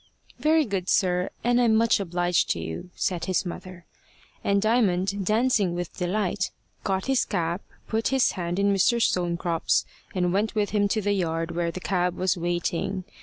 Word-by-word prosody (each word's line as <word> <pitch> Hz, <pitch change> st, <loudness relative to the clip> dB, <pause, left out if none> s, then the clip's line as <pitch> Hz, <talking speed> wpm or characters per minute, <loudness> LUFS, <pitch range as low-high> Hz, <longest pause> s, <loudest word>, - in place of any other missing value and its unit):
"Very 310 Hz, +3 st, +3 dB
good, 195 Hz, -4 st, -3 dB
sir. 180 Hz, -1 st, +2 dB
And 245 Hz, +1 st, +3 dB
I'm 230 Hz, -2 st, +4 dB
much 230 Hz, 0 st, +3 dB
obliged 175 Hz, -2 st, 0 dB
to 85 Hz, -, -6 dB
you," 80 Hz, -, -6 dB
said 180 Hz, -3 st, -1 dB
his 185 Hz, +1 st, 0 dB
mother. 180 Hz, 0 st, -8 dB, 0.6 s
And 200 Hz, 0 st, +2 dB
Diamond, 200 Hz, -3 st, +1 dB
dancing 215 Hz, -5 st, +2 dB
with 175 Hz, -1 st, -5 dB
delight, 185 Hz, +1 st, -1 dB, 0.3 s
got 190 Hz, -2 st, -1 dB
his 270 Hz, -1 st, +2 dB
cap, 170 Hz, -1 st, -2 dB, 0.3 s
put 225 Hz, 0 st, 0 dB
his 265 Hz, -2 st, +3 dB
hand 175 Hz, -1 st, -3 dB
in 200 Hz, 0 st, +3 dB
Mr. 215 Hz, +5 st, +3 dB
Stonecrop's, 170 Hz, -5 st, +1 dB, 0.3 s
and 180 Hz, -1 st, +1 dB
went 210 Hz, +3 st, 0 dB
with 210 Hz, -1 st, 0 dB
him 205 Hz, -1 st, +2 dB
to 215 Hz, +2 st, 0 dB
the 205 Hz, +1 st, +1 dB
yard 165 Hz, -3 st, -1 dB
where 170 Hz, 0 st, -1 dB
the 175 Hz, -, -5 dB
cab 180 Hz, -1 st, 0 dB
was 185 Hz, 0 st, +1 dB
waiting. 175 Hz, +2 st, -2 dB
190 Hz, 170 wpm, -26 LUFS, 175-210 Hz, 0.6 s, I'm